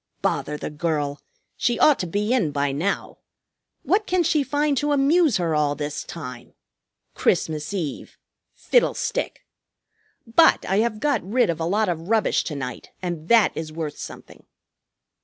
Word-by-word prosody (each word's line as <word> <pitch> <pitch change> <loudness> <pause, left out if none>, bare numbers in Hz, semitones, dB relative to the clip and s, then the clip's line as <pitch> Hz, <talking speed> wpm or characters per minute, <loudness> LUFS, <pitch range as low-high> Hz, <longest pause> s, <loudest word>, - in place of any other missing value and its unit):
Bother 150 - -1
the - - -5
girl! 150 -2 -2 0.3
She 240 -1 0
ought 300 - +5
to 180 - -2
be 205 +7 0
in 225 -12 +2
by 140 0 0
now. 165 +9 -2 0.6
What 420 +2 +1
can 360 -1 +2
she 320 -2 +2
find 290 +1 0
to 295 0 +1
amuse 290 - +3
her 170 -3 0
all 150 -1 +1
this 150 0 -4
time? 125 -7 -9 0.6
Christmas 155 +1 0
Eve! 170 -8 -5 0.4
Fiddlestick! - - 0 0.8
But 320 +8 +4
I 190 - +1
have 215 0 +1
got 285 -4 +1
rid 210 0 +1
of 165 - -6
a 165 - -1
lot 210 +5 +1
of 170 0 -3
rubbish 225 -1 +2
to 150 - -4
night, 125 -3 -6
and 170 -3 -4
that 230 -1 +4
is 160 -1 -5
worth 155 -2 -5
something." - - -10
180 Hz, 155 wpm, -23 LUFS, 150-255 Hz, 0.8 s, ought